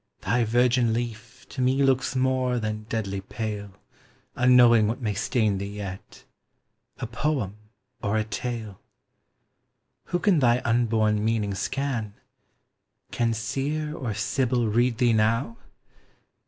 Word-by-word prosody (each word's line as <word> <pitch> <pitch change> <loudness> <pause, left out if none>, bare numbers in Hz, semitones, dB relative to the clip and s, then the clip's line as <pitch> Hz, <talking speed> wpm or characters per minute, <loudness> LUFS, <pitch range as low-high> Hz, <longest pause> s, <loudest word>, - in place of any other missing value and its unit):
thy 120 +5 +1
virgin 120 +1 +2
leaf 115 -1 -5
To 135 - -5
me 130 +2 +2
looks 135 0 +1
more 130 -1 +1
than 110 -1 -4
deadly 100 -3 -2
pale, 105 0 -5 0.7
Unknowing 120 -3 +6
what 115 +3 -2
may 110 -5 -1
stain 105 -1 0
thee 100 +1 -5
yet, 100 -2 -8 0.7
A - - -4
poem 120 -4 -2 0.5
or 110 -1 0
a 110 - +1
tale. 110 -2 -5 1.2
Who 175 - -1
can 180 -2 +3
thy 120 -2 +4
unborn 110 -3 +2
meaning 110 -2 0
scan? 120 0 -3 1.0
Can 115 -1 +1
Seer 145 +7 -2
or 120 -9 -4
Sibyl 120 +1 0
read 120 +2 +2
thee 120 -1 +3
now? 115 +2 +1
115 Hz, 125 wpm, -25 LUFS, 110-125 Hz, 1.2 s, Unknowing